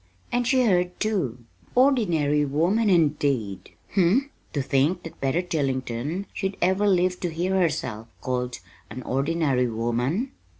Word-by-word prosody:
And 245 Hz, -1 st, 0 dB
she 255 Hz, -2 st, +3 dB
heard, 180 Hz, -3 st, +1 dB
too! 140 Hz, -, -1 dB, 0.3 s
'Ordinary 175 Hz, -, +3 dB
woman,' 175 Hz, +10 st, +1 dB
indeed! 145 Hz, -, +1 dB, 0.2 s
Humph! 200 Hz, +9 st, +3 dB, 0.2 s
To 140 Hz, -, -1 dB
think 145 Hz, +7 st, +1 dB
that 165 Hz, -, -10 dB
Betty 135 Hz, +6 st, +1 dB
Tillington 140 Hz, +1 st, -2 dB
should 195 Hz, -1 st, -3 dB
ever 190 Hz, +3 st, +2 dB
live 180 Hz, -1 st, +2 dB
to 175 Hz, -, -2 dB
hear 175 Hz, +4 st, -1 dB
herself 130 Hz, -, -1 dB
called 125 Hz, -1 st, -2 dB, 0.3 s
an 130 Hz, -, -7 dB
'ordinary 135 Hz, -1 st, +1 dB
woman'! 120 Hz, -, -1 dB
165 Hz, 130 wpm, -25 LUFS, 130-190 Hz, 0.3 s, she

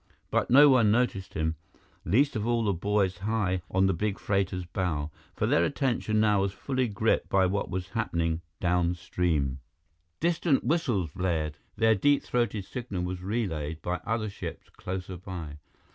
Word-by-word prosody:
But -, -, +1 dB
no 145 Hz, +4 st, +8 dB
one 125 Hz, -6 st, +5 dB
noticed 105 Hz, -4 st, 0 dB
him, 80 Hz, 0 st, -1 dB, 0.5 s
least 130 Hz, -, +3 dB
of 110 Hz, +1 st, -1 dB
all 120 Hz, -1 st, +2 dB
the 100 Hz, -2 st, +1 dB
boys 95 Hz, 0 st, 0 dB
high 100 Hz, -3 st, 0 dB
on 95 Hz, +1 st, +3 dB
the 95 Hz, -, +3 dB
big 105 Hz, +3 st, -1 dB
freighter's 95 Hz, -2 st, -1 dB
bow, 80 Hz, -4 st, -2 dB, 0.2 s
for -, -, 0 dB
their 85 Hz, -, +3 dB
attention 120 Hz, -3 st, 0 dB
now 105 Hz, -2 st, +3 dB
was 100 Hz, 0 st, -1 dB
fully 130 Hz, +5 st, -1 dB
gripped 110 Hz, +1 st, 0 dB
by 95 Hz, -1 st, +4 dB
what 100 Hz, +2 st, -1 dB
was 95 Hz, 0 st, -4 dB
happening 85 Hz, -6 st, -1 dB, 0.2 s
downstream. 85 Hz, -5 st, 0 dB, 0.6 s
Distant 165 Hz, -4 st, +2 dB
whistles 120 Hz, -, 0 dB
blared; 80 Hz, -4 st, -1 dB, 0.2 s
their 110 Hz, +1 st, +4 dB
deep 140 Hz, +7 st, +3 dB
throated 120 Hz, -5 st, -1 dB
signal 110 Hz, -8 st, -4 dB
was 90 Hz, 0 st, -4 dB
relayed 85 Hz, -7 st, -2 dB
by 90 Hz, +1 st, -1 dB
other 110 Hz, -2 st, -1 dB
ships -, -, -8 dB
closer 90 Hz, 0 st, -5 dB
by. 85 Hz, -5 st, -7 dB
95 Hz, 160 wpm, -28 LUFS, 90-110 Hz, 0.6 s, no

